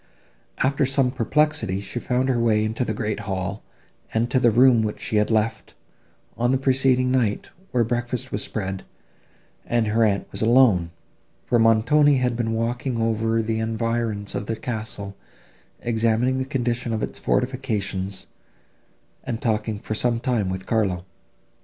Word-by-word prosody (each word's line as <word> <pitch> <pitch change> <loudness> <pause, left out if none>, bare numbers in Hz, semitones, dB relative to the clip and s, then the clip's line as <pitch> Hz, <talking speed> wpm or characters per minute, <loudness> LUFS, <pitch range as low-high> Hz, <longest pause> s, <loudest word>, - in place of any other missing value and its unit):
After 140 +2 +2
some 135 -1 +2
perplexity 130 -5 +1
she 100 +4 -5
found 125 +2 0
her 125 -3 +1
way 110 -2 +2
into 110 +3 -1
the 110 -3 -2
great 105 -2 -2
hall, 95 0 -4 0.5
and 115 +2 0
to 130 - +3
the 120 - +4
room, 120 +1 +5
which 105 -1 -3
she 110 - -1
had 105 - +2
left, 110 0 -1 0.6
on 120 +1 +1
the 135 - +3
preceding 130 -1 +2
night, 120 -6 0 0.2
where 120 -2 +2
breakfast 120 +2 -3
was - - -1
spread, 95 -3 -4 0.8
and 120 -1 0
her 110 +2 +2
aunt 100 -2 +1
was - - -5
alone, 110 -7 +4 0.6
for 120 - +2
Montoni 135 +6 +4
had 125 -2 0
been 115 -1 -1
walking 120 +2 -2
over 115 0 +1
the 110 0 -1
environs 115 -2 -2
of 100 - -4
the 115 - -1
castle, 110 -3 -5 0.7
examining 115 +3 +1
the 130 - -1
condition 120 -3 -2
of 110 - -2
its - - -5
fortifications, 105 -7 -2 1.0
and 115 - -4
talking 110 -2 -1
for 110 - -5
some 115 +1 +1
time 115 -6 0
with 95 0 -4
Carlo. 95 -6 0
115 Hz, 155 wpm, -23 LUFS, 110-125 Hz, 1.0 s, room